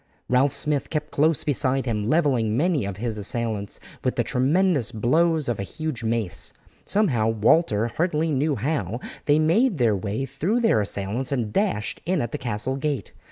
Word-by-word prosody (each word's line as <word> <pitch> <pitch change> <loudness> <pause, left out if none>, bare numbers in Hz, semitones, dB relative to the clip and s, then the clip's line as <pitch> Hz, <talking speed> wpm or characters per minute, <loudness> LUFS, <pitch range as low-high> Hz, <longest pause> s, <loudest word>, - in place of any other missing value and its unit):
Ralph 130 +3 +3
Smith 145 0 -1
kept 150 -1 -3
close 155 +1 +2
beside 135 -2 +1
him, 110 -3 -1
levelling 130 -9 +2
many 155 - +1
of 100 -1 -5
his 110 -1 -3
assailants 105 -1 -1 0.2
with - - 0
the - - +1
tremendous 140 - +2
blows 155 +7 +2
of 120 -4 -1
a - - -1
huge 135 +4 -4
mace. 110 -5 -2 0.3
Somehow, 135 - +2
Walter 115 +1 +3
hardly 160 +3 0
knew 145 +1 +1
how, 120 - -2 0.3
they 145 0 +4
made 175 +8 +3
their 115 -5 +3
way 105 +6 -3
through 165 - -1
their 225 - +3
assailants 105 +6 -3
and 115 -6 -1
dashed 190 - -1
in 185 -1 +1
at 120 -4 -2
the 150 - -4
castle 120 +2 -2
gate. 145 -1 -3
130 Hz, 170 wpm, -24 LUFS, 110-155 Hz, 0.3 s, they